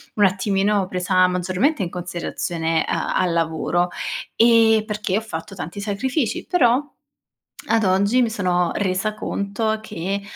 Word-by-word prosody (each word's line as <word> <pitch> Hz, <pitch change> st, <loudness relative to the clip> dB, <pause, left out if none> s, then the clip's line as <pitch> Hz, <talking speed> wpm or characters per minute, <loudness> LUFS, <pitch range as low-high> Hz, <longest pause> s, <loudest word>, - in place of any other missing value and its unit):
un 205 Hz, -, +4 dB
attimino 195 Hz, +1 st, +1 dB
presa 185 Hz, 0 st, +2 dB
maggiormente 185 Hz, -, 0 dB
in 175 Hz, -, -3 dB
considerazione, 170 Hz, -2 st, -2 dB
uhm, -, -, 0 dB, 0.2 s
al 180 Hz, -2 st, +2 dB
lavoro, 165 Hz, +2 st, 0 dB, 0.5 s
ehm, 225 Hz, -1 st, +5 dB
perché 210 Hz, -2 st, -1 dB
ho -, -, -1 dB
fatto 195 Hz, -2 st, -7 dB
tanti 175 Hz, +2 st, -6 dB
sacrifici. 220 Hz, +6 st, -2 dB
Però, 285 Hz, -3 st, +2 dB, 0.7 s
ad 225 Hz, -2 st, +2 dB
oggi 200 Hz, +6 st, +3 dB
mi 230 Hz, -, +1 dB
sono 180 Hz, -4 st, 0 dB
resa 195 Hz, +1 st, 0 dB
conto 215 Hz, +1 st, -2 dB
che, 200 Hz, -1 st, -4 dB
200 Hz, 135 wpm, -21 LUFS, 180-220 Hz, 0.7 s, ehm